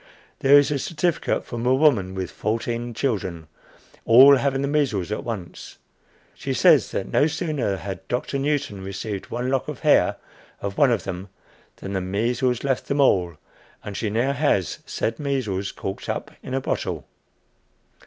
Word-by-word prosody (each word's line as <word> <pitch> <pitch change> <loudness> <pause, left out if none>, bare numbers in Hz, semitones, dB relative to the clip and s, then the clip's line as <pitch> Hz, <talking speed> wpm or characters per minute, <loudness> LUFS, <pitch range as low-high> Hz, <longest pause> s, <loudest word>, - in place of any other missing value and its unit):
There 140 +1 +7
is 145 0 +4
a 145 - 0
certificate 170 +4 -1
from 120 -1 -5
a 125 +1 +3
woman 115 -11 +3
with 95 -1 -4
fourteen 115 +2 -3
children, 95 -10 -2 0.6
all 135 +4 +8
having 135 0 0
the - - 0
measles 135 - 0
at 105 - -3
once. 105 -8 -7 0.6
She - - -4
says - - +5
that 95 - -3
no 145 - +4
sooner 150 - -2
had 95 +1 -7
Doctor 125 +3 -2
Newton 140 -8 -1
received 100 +1 -5
one 125 +2 -2
lock 135 -1 0
of - - -6
hair - - +4 0.4
of 100 -1 -4
one 145 - +4
of 115 -3 0
them, 95 0 -6 0.5
than 95 - -7
the 95 - -1
measles 115 +6 0
left 135 -2 -1
them 140 - -1
all, 90 - +3 0.5
and 105 - -7
she 110 - -2
now 120 +6 +1
has 140 - 0
said 115 0 -2
measles 120 -10 -2
corked 95 - -6
up - - -3
in 130 - -5
a 135 - 0
bottle! - - -3
120 Hz, 165 wpm, -23 LUFS, 100-140 Hz, 0.6 s, all